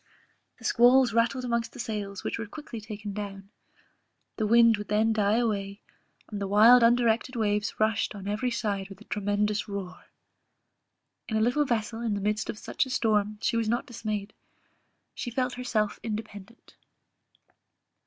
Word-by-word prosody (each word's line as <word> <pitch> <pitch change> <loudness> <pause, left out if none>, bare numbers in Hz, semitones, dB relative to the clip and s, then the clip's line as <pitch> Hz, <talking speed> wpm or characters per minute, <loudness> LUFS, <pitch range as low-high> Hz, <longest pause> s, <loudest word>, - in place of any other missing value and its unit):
The 225 - -13
squalls 245 +1 +5
rattled 235 +3 +1
amongst 235 -1 -1
the - - -11
sails, 205 -4 -4
which - - -3
were 225 - -4
quickly 255 -3 -8
taken 210 -1 -7
down; 200 -1 -7 0.9
the 215 - 0
wind 230 0 +6
would 210 - -7
then 215 +2 +2
die 210 -1 +2
away, 200 -4 -1 0.5
and 205 -1 -4
the 200 - -1
wild 225 +5 +7
undirected 235 +1 +3
waves 210 -1 -1
rushed 215 0 +1
on 200 -1 -8
every 215 +5 -1
side 205 -4 -2
with 195 -1 -11
a - - -13
tremendous 210 0 -1
roar. 195 -3 -7 1.2
In 220 - 0
a - - +1
little 250 +6 +2
vessel 225 -2 -2
in 225 -3 -1
the - - -2
midst 210 +2 -1
of - - -4
such 265 - -2
a - - -9
storm 215 -4 +1
she 230 - +1
was 225 -1 0
not 240 +5 0
dismayed; 215 -5 -5 0.8
she - - -5
felt 250 +1 -1
herself 225 -4 -1
independent. 215 0 -8
220 Hz, 165 wpm, -27 LUFS, 205-235 Hz, 1.2 s, wild